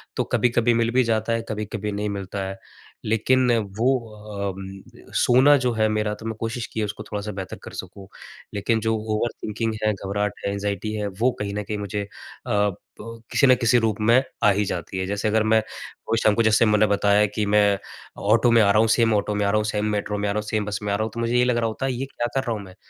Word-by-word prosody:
तो - - +1
कभी-कभी 120 -1 +3
मिल 115 0 +1
भी 130 +1 +3
जाता 115 -1 0
है, 115 - 0
कभी-कभी 105 -1 -4
नहीं 105 +1 -2
मिलता 100 -1 -4
है। 95 0 -6 0.5
लेकिन 125 +4 +2 0.3
वो 120 +3 +2 0.6
उम, 95 0 -11
सोना 130 +4 +6
जो 125 - +2
है 110 -1 +2
मेरा 105 -1 0
तो 110 - -12
मैं 110 -1 -3
कोशिश 115 +1 -3
की - - -3
है 110 - +1
उसको 105 +1 -6
थोड़ा-सा 105 0 -3
बेहतर 95 -2 -6
कर - - -9
सकूँ। 95 +1 -13 0.5
लेकिन 110 +3 0
जो 110 +1 +1 0.2
ओवर 115 +2 0
थिंकिंग 110 +1 -2
है, 110 - +3
घबराहट 100 +1 -2
है, 100 - 0
एंग्जायटी 100 +1 -3
है, 105 -1 -2
वो 110 +6 0
कहीं 100 -1 -3
न 105 - -2
कहीं 105 +1 -4
मुझे 105 0 -3
अ, - - -10 0.4
ब, 105 -1 +2 0.6
किसी 140 - +4
ना 130 - +7
किसी 120 -1 +3
रूप 105 -2 -2
में 115 +4 +5 0.2
आ 105 - +6
ही 100 +1 +1
जाती 90 0 -4
है। 95 - -1
जैसे 100 +2 -1
अगर 110 0 +2
मैं, 110 +1 +4
वो 110 +1 -6
शाम 105 -1 +4
को 115 - +2
जैसे 110 +1 +4
मैंने 105 0 +4
बताया 100 +1 +3
कि 105 - 0
मैं, 105 -1 +3 0.4
ऑटो 115 +4 +3
में 115 -1 +6
आ 100 -1 +4
रहा 105 - +4
हूँ, 115 - +4
सेम 115 -2 +3
ऑटो 105 0 0
में 105 0 0
आ - - +2
रहा 105 - +2
हूँ, 105 - 0
सेम 105 -1 -1
मेट्रो 105 0 -3
में 100 0 -1
आ - - +1
रहा 105 - -2
हूँ, 105 - -6
सेम 105 -1 -1
बस 105 0 -3
में 100 -1 -1
आ - - +2
रहा 110 - -1
हूँ। 110 - -3
तो 115 - -6
मुझे 115 +1 +1
ये 125 - +4
लग 125 -1 +1
रहा 115 -1 +1
होता 110 +4 -3
है 135 - 0
ये 125 +2 -3
क्या 120 - -1
कर 135 - +1
रहा 115 - 0
हूँ 105 - -6
मैं? 95 -1 -14
105 Hz, 260 wpm, -23 LUFS, 100-115 Hz, 0.6 s, ना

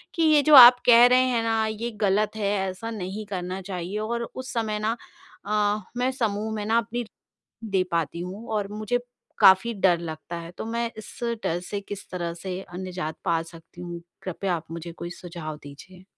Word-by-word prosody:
कि 330 - +1
ये 305 -2 +6
जो 305 -1 +7
आप 245 -1 +12
कह 240 0 +8
रहे 250 +1 +5
हैं 230 -2 +1
ना, 225 -1 +1
ये 225 +2 -4
गलत 210 +2 +2
है, 205 -2 0 0.2
ऐसा 225 +5 -6
नहीं 205 0 -5
करना 185 0 -4
चाहिए 185 +1 -5
और 235 +2 -3
उस 260 0 -6
समय 215 -2 -1
ना 220 +2 0 0.5
अ, 210 0 +1 0.2
मैं 255 +1 +1
समूह 215 0 -1
में 210 -1 -3
ना 225 +2 +2
अपनी 240 0 -7 0.6
पाती 170 0 -1
हूँ 195 +6 -7
और 205 -2 -1
मुझे 215 +3 -1 0.4
काफ़ी 190 +5 +6
डर 185 -3 +3
लगता 160 0 -6
है 170 0 -9
तो - - -4
मैं 230 0 -2
इस 215 - -10 0.3
डर 170 - 0
से 205 -1 -2
किस 200 0 -8
तरह 170 -2 -3
से 185 -1 -4
अ, 175 - -11
निजात 180 -4 -5
पा 165 -1 +2
सकती 165 +1 -14
हूँ, 175 -1 -7 0.2
कृपया 185 0 -2
आप 165 - -8
मुझे 170 0 -6
कोई 175 +1 -7
सुझाव 170 -4 -7
दीजिए? 180 +6 -13
200 Hz, 195 wpm, -25 LUFS, 175-225 Hz, 0.6 s, आप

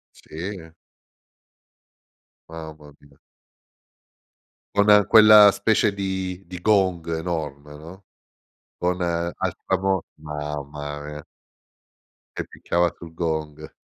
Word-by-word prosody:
Sì, - - -20
eh 85 -2 -7 1.8
Mamma 75 -3 -10
mia! 70 -1 -22 1.6
Con 105 -1 +5
quella 105 -2 +9
specie 110 -1 +1
di 95 -1 -4
di 90 0 -8
gong 95 -5 +2
enorme, 75 -4 -5
no? 85 +6 -12 0.8
Con 90 0 -1
altra 85 +2 -2
vo 95 -2 0
mamma 75 -1 -6
mia! 75 0 -8 1.1
Che - - -4
picchiava 85 0 0
sul 80 -1 -11
gong. 80 -2 -4
85 Hz, 90 wpm, -23 LUFS, 75-95 Hz, 1.8 s, quella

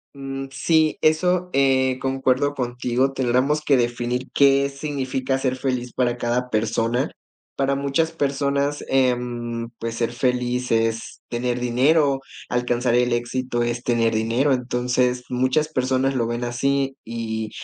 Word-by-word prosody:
Mm. 135 0 -5
Sí, 155 +3 +2
eso, 180 +3 +2
eh, 130 -1 +2
concuerdo 135 +1 +1
contigo, 125 +1 0
tendríamos 130 +3 +1
que 140 -2 +3
definir 120 +1 -1
qué 140 0 +4
significa 135 -2 -2
ser 130 -1 -1
feliz 125 -2 -2
para 120 -1 0
cada 120 +1 -1
persona. 115 +4 0 0.5
Para 135 0 +1
muchas 140 +4 0
personas, 140 -1 -1
em, 120 -2 0
pues, 115 0 -3
ser 115 0 -1
feliz 125 0 -1
es 115 0 0
tener 120 0 -1
dinero, 135 +4 +2 0.3
alcanzar 125 0 0
el 125 0 +3
éxito 120 0 -1
es 120 0 -2
tener 115 -2 +1
dinero. 115 +6 +1
Entonces, 125 0 0
muchas 130 +5 +1
personas 130 -2 0
lo 115 -3 0
ven 120 +1 -2
así 135 +2 0
y, 110 -1 -4
125 Hz, 135 wpm, -22 LUFS, 120-135 Hz, 0.5 s, qué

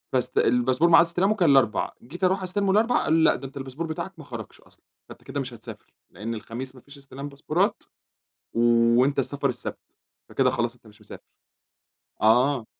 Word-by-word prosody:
بس 125 -1 -1
الباسبور 125 +7 +3
معاد 170 0 +7
استلامه 180 +5 +1
كان 175 -7 +3
الأربع، 135 -5 +2
جيت 165 +10 -10
أروح 190 +1 +2
أستلمه 195 +2 0
الأربعاء، 225 +5 +2
قالوا 160 - +2
لي: 160 - +3
"لأ، - - +5
ده 135 - -7
أنت 135 - -12
الباسبور 135 +4 -5
بتاعك 160 +4 -5
ما 155 - -10
خرجش 115 -7 -9
أصلًا، - - -19 0.2
فأنت - - -13
كده 140 +1 -5
مش 130 -2 -5
هتسافر. 115 -1 -12 0.2
لأن 105 +6 -5
الخميس 120 +4 -7
ما 130 - -14
فيش 140 +3 -13
استلام 140 +1 -9
باسبورات 140 0 -1 0.7
وأنت 120 +3 +3
السفر 140 +1 -1
السبت، 125 0 -7 0.3
فكده - - +2
خلاص 120 0 -2
أنت 120 - -22
مش 105 -1 -19
مسافر." - - -11 1.0
آه. 125 +3 +3
135 Hz, 185 wpm, -25 LUFS, 120-165 Hz, 1.0 s, معاد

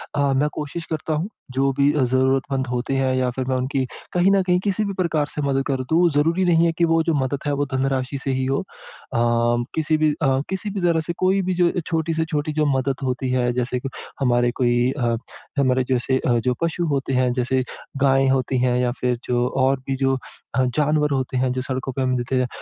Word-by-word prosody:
अ, 140 -1 +2
मैं 145 +3 +2
कोशिश 155 +3 -5
करता 155 0 -3
हूँ, 165 +7 -2 0.2
जो 135 +1 +1
भी 140 +2 +3
अ, 150 - +1
ज़रूरतमंद 130 +1 +1
होते 125 +2 -2
हैं 130 -1 +1
या 130 -1 +1
फिर 130 -1 -2
मैं 130 - +1
उनकी 130 +1 -1 0.3
कहीं 180 +2 +4
न 195 -1 +4
कहीं 180 0 +2
किसी 205 +1 0
भी 200 - -3
प्रकार 165 -5 0
से 150 - -2
मदद 135 -1 +1
कर 130 -2 -1
दूँ, 170 +2 +4
ज़रूरी 165 +6 +2
नहीं 170 -1 +4
है 165 - +3
कि 170 - +5
वो 165 0 +3
जो 165 - +1
मदद 135 +1 -1
है, 145 - +1
वो 145 0 0
धनराशि 135 0 -1
से 135 - -1
ही 130 0 -1
हो। 135 +1 0 0.5
अम, 120 0 +2
किसी 155 0 +1
भी 155 -1 +3
अ, - - +4 0.2
किसी 190 +2 -3
भी 195 -2 -4
तरह 165 -1 +3
से 170 - -1
कोई 190 +1 +3
भी 185 0 -1
जो 170 - +5
अ, 180 - -2
छोटी 165 -1 0
से 160 0 0
छोटी 150 -1 -2
जो 155 0 +1
मदद 135 0 0
होती 130 0 -1
है, 125 -1 +1
जैसे 125 0 -1
कि 135 - -5 0.3
हमारे 120 -2 +2
कोई 120 +1 +3
अ, 120 -5 0 0.4
हमारे 130 -1 +3
जैसे 130 +1 +1
अ, 120 -1 +3
जो 125 +2 0
पशु 170 +1 0
होते 135 -1 -1
हैं, 125 -1 +2
जैसे 130 +1 0 0.4
गाय 135 0 +4
होती 130 -1 +1
हैं 125 -1 +2
या 125 -1 +1
फिर 125 -1 0
जो 125 0 +1 0.2
और 135 0 +2
भी 135 - 0
जो 135 0 +2 0.4
अ, 130 - +3
जानवर 150 0 +2
होते 130 -1 -1
हैं, 130 0 +1
जो 130 - -2
सड़कों 130 +1 -3
पे 135 - -2
हमें 130 0 +1
दिखते 120 +2 -1
जाएँ, 125 -1 +1
135 Hz, 235 wpm, -22 LUFS, 130-155 Hz, 0.5 s, कि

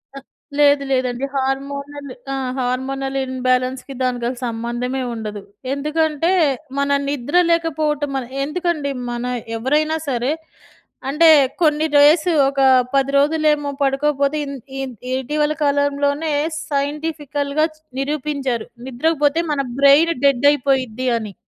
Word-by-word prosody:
అ - - -6 0.4
లేదు 285 -1 +5
లేదండి. 255 0 0
హార్మోనల్ 280 +1 -3 0.2
ఆ! - - -1 0.2
హార్మోనల్ 270 +2 -2
ఇన్‌బాలెన్స్‌కి 255 +1 -1
దానికి 250 -2 -1
అసలు 250 -1 -6
సంబంధమే 240 +3 -3
ఉండదు. 210 -2 -6 0.3
ఎందుకంటే 305 +3 0 0.5
మన 280 0 0 0.2
నిద్ర 285 +2 -3 0.2
లేకపోవటం 300 -4 0 0.3
ఎందుకండి 305 -1 -1 0.2
మన 240 0 -4 0.3
ఎవరైనా 300 +6 +1
సరే 250 +1 0 0.8
అంటే 310 +4 +4 0.3
కొన్ని 305 -1 +3
డేస్ 305 +4 +6 0.2
ఒక 275 0 -1 0.3
10 275 0 +2
రోజులేమో 300 0 +2
పడుకోకపోతే 280 +1 +1
ఇం 280 - -6 0.3
ఇం 270 -1 -3 0.2
ఇటీవల 295 +4 0
కాలంలోనే 285 +2 +1 0.4
సైంటిఫికల్‌గా 290 0 -1
చూ - - -26 0.2
నిరూపించారు 275 -4 -2 0.2
నిద్ర‌కు 290 +5 -1
పోతే 295 +3 +2
మన 285 -2 0 0.2
బ్రైన్ 285 +4 +6
డెడ్ 275 -1 +3
అయిపోయిద్ది 260 -3 0
అని. 215 -3 -6
280 Hz, 110 wpm, -20 LUFS, 260-300 Hz, 0.8 s, డేస్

